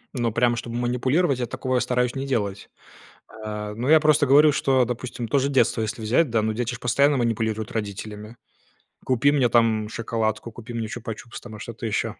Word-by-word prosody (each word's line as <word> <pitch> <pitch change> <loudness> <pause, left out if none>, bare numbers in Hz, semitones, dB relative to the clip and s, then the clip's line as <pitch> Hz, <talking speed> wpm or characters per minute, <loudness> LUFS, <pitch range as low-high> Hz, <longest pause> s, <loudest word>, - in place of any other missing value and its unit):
Ну, 120 -2 0
прям 120 +1 +2
чтобы 115 0 -6
манипулировать, 130 +5 +1
я 120 - -2
такого 130 0 -1
стараюсь 125 0 0
не 135 0 -3
делать. 100 -7 -2 0.8
Э, 105 0 -5
ну, 120 +5 -2
я 155 0 +7
просто 150 -1 +3
говорю, 145 +2 +6
что, 130 -4 +2
допустим, 120 0 -5
то 140 +5 +2
же 140 +1 0
детство 125 -3 +2
если 110 +2 -4
взять, 125 +8 +2
да, 115 -1 +1
ну, 110 0 -1
дети 120 +2 -2
ж 125 - -7
постоянно 140 +4 +2
манипулируют 110 -2 -1
родителями: 105 +1 -6 0.7
купи 130 +3 +3
мне, 130 -5 +2
там, 110 -2 +2
шоколадку, 115 -1 -2
купи 120 +1 -10
мне 115 -1 -3
чупа-чупс, 115 0 -7
там, 110 -3 -10
что-то 115 +1 -8
ещё. 110 0 -2
120 Hz, 185 wpm, -24 LUFS, 110-130 Hz, 0.8 s, я